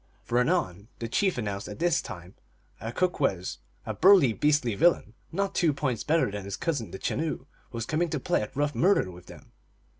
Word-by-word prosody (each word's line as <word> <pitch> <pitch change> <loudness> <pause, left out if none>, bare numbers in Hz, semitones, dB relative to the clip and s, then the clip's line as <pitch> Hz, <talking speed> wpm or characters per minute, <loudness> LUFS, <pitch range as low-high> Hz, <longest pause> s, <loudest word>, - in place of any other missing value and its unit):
For 120 - +1
anon 110 - 0
the 115 - -4
chief 185 - +1
announced 100 -3 -3
that - - -7
this 170 0 +2
time 90 -4 -9 0.5
a 115 +2 -5
Kookwes 135 - -1 0.3
a - - -3
burly, 180 - +6
beastly 145 -3 +2
villain, 155 - +2 0.2
not 195 +3 -1
two 165 -5 +2
points 130 -5 -2
better 155 -8 +2
than 100 -1 -5
his 100 0 -5
cousin 140 -10 -2
the - - -7
Chenoo 155 0 -2 0.3
was 115 -1 -4
coming 165 +6 0
to 155 - -2
play - - 0
at 105 - -6
rough 145 +1 0
murder 175 - +2
with 90 0 -14
them. - - -14
130 Hz, 190 wpm, -27 LUFS, 105-165 Hz, 0.5 s, burly